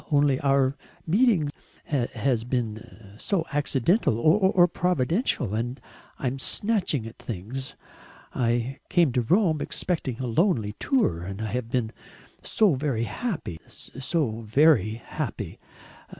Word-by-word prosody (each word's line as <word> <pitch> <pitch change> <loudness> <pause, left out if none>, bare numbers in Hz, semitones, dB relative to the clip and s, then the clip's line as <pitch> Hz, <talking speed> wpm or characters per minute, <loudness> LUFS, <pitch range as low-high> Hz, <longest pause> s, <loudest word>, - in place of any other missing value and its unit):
Only 145 -3 +3
our 135 -1 +2 0.3
meeting 185 - +3 0.3
has 130 -3 -1
been 110 -4 -5
so 185 -5 0
accidental 145 - +2
or 180 - +5
providential 175 - 0
and 120 +4 -2 0.4
I - - -6
am 130 +2 -1
snatching 190 - 0
at 115 - -10
things. 115 +6 -5 0.6
I 120 +2 0
came 170 -6 +4
to 125 0 +1
Rome 165 - +2
expecting 140 -9 -2
a 130 - -2
lonely 120 - +1
tour... 230 - +1
and 95 +3 -6
I 110 -2 -3
have 125 -1 -3
been 115 -3 -1 0.5
so 210 -6 +3
very 130 -4 -1
happy, 155 - -4
so 130 -3 -3
very 110 - +4
happy. 115 - -5
130 Hz, 120 wpm, -26 LUFS, 115-165 Hz, 0.6 s, or